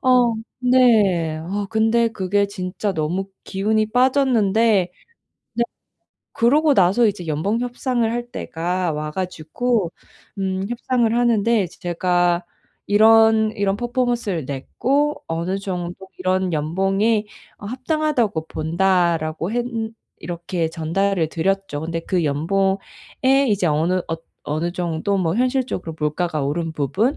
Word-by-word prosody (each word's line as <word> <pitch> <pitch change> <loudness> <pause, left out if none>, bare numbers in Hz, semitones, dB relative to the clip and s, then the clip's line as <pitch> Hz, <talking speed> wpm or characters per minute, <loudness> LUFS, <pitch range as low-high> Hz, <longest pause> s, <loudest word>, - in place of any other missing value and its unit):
어, 250 -2 +4 0.3
네. 215 -11 +4
어 195 +6 -3
근데 225 +2 +2
그게 200 -1 0
진짜 200 +1 -3
너무 175 +5 -1 0.2
기운이 215 +3 0
빠졌는데 230 -7 +3 0.6
네. 235 - +1 0.7
그러고 295 +6 +3
나서 200 +4 +4
이제 185 -4 -2
연봉 165 +9 -1
협상을 245 -1 -1
할 240 +1 -3
때가 175 -1 -2
와 150 0 -3
가지고 185 +4 -2 0.5
음 190 0 -1
협상을 240 -1 0
하는데 235 -2 +3
이제 175 - -11
제가 175 0 +1 0.4
"이런, 220 +1 +5
이런 200 -1 +1
퍼포먼스를 240 - -1
냈고 275 - -1
어느 170 +4 -2
정도 185 -1 -5
이런 185 0 0
연봉이 195 +8 +1 0.3
어 205 - -7
합당하다고 255 - -1
본다"라고 170 -1 0
했는 230 -2 -2 0.3
이렇게 170 0 -3
전달을 170 +2 0
드렸죠. 190 -2 -1
근데 165 +1 -3
그 175 0 -1
연봉에 190 +7 +1 0.7
이제 200 -4 +1
어느 160 +3 +1
어 165 - -1 0.3
어느 160 +4 -2
정도 175 +2 -1
뭐 170 -3 0
현실적으로 250 -9 -1
물가가 155 +1 -1
오른 160 +3 -2
부분, 185 - 0
195 Hz, 260 characters per minute, -21 LUFS, 170-230 Hz, 0.7 s, 이런